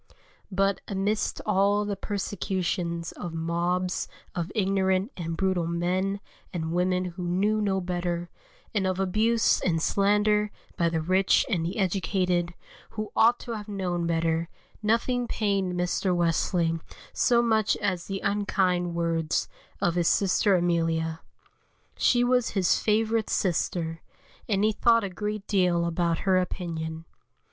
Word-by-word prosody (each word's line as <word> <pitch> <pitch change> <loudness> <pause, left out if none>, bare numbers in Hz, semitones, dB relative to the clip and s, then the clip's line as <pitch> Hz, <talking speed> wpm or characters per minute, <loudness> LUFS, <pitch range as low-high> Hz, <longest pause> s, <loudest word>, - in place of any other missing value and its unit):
But 195 +1 +1
amidst 200 +2 -1
all 205 0 +2
the 205 -1 -2
persecutions 185 -4 -2
of 170 -2 -7
mobs 175 +2 -1 0.3
of 175 -1 -3
ignorant 190 +1 +1
and 165 -2 -4
brutal 185 -3 +1
men 185 +4 -1 0.3
and 160 -3 -3
women 180 +1 +1
who 180 0 -6
knew 205 +5 +1
no 195 -2 +1
better, 175 -1 -2 0.5
and 195 -3 +1
of 185 0 -1
abuse 220 +4 +2
and 165 -3 +1
slander 210 +3 +2 0.3
by 170 -3 +2
the 165 -1 -1
rich 185 +4 +3
and 185 -10 0
the 170 +4 -3
educated, 180 -2 0 0.3
who 215 -1 -5
ought 235 +2 +5
to 240 - -7
have 215 -2 -5
known 180 -4 -2
better, 165 0 0 0.3
nothing 235 +3 +1
pained 200 -5 0
Mr. 180 +1 0
Wesley 165 0 +1 0.3
so 240 -1 +3
much 220 -3 +2
as 185 -4 -2
the 195 -1 -4
unkind 185 -4 0
words 165 -2 0 0.3
of 175 - +1
his 175 -1 +1
sister 195 +1 +3
Emilia. 165 -2 0 0.8
She 245 -1 +3
was 250 -1 +2
his 185 -2 +3
favourite 220 0 +1
sister, 165 -2 -1 0.5
and 200 -1 +2
he 215 - +4
thought 230 +1 +3
a 200 - -2
great 210 +2 -4
deal 180 -4 +2
about 170 0 0
her 190 -1 +4
opinion. 165 -3 -4
185 Hz, 135 wpm, -27 LUFS, 170-205 Hz, 0.8 s, ought